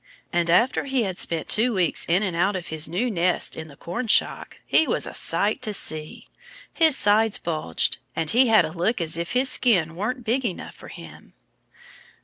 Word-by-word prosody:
And 170 -1 0
after 235 +13 +2
he 265 -3 0
had 190 -3 -3
spent 165 -2 -1
two 230 +1 +1
weeks 180 -4 0
in 180 +5 +2
and 185 -4 -3
out 190 +4 +1
of 180 -2 -6
his 155 -1 +1
new 230 +9 -1
nest 180 -2 0
in 160 - -8
the 145 - -14
cornshock 210 - 0
he 315 - +3
was - - -1
a - - -7
sight 210 +2 0
to 215 -1 -1
see. 155 -4 -4 0.5
His 320 -4 +3
sides 210 +1 +3
bulged. 155 - -1 0.2
And 160 -1 0
he 250 +2 +4
had 225 -1 +5
a - - -6
look 180 +8 -1
as 165 -2 0
if 170 +1 -3
his 255 +2 +2
skin 180 -12 +1
weren't 240 +7 -4
big 240 +4 -1
enough 200 -7 -5
for - - -14
him. - - -13
190 Hz, 195 wpm, -23 LUFS, 170-235 Hz, 0.5 s, had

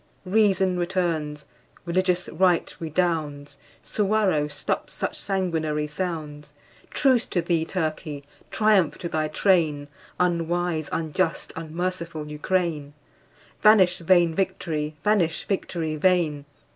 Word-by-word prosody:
Reason 190 -2 +2
returns, 165 -5 -1 0.4
religious 180 0 +1
right 180 -2 +1
redounds, 155 -4 -2 0.2
Suwarrow 200 -7 +1
stops 150 - -3
such - - -2
sanguinary 160 -6 -1
sounds. 150 -2 -5 0.3
Truce 260 -4 +2
to 180 - -1
thee, 165 -1 0
Turkey! 155 -4 -3 0.3
Triumph 210 -6 +3
to 170 - -4
thy 155 -2 -1
train, 155 -4 +1 0.3
Unwise, 175 -2 0
unjust, 165 +2 -1
unmerciful 165 -1 -4
Ukraine! 150 -2 -1 0.7
Vanish 195 -5 +6
vain 170 -1 +4
victory! 160 -4 -2
vanish, 190 -7 +1
victory 170 -5 -2
vain! 160 -4 +2
170 Hz, 100 wpm, -25 LUFS, 155-185 Hz, 0.7 s, Vanish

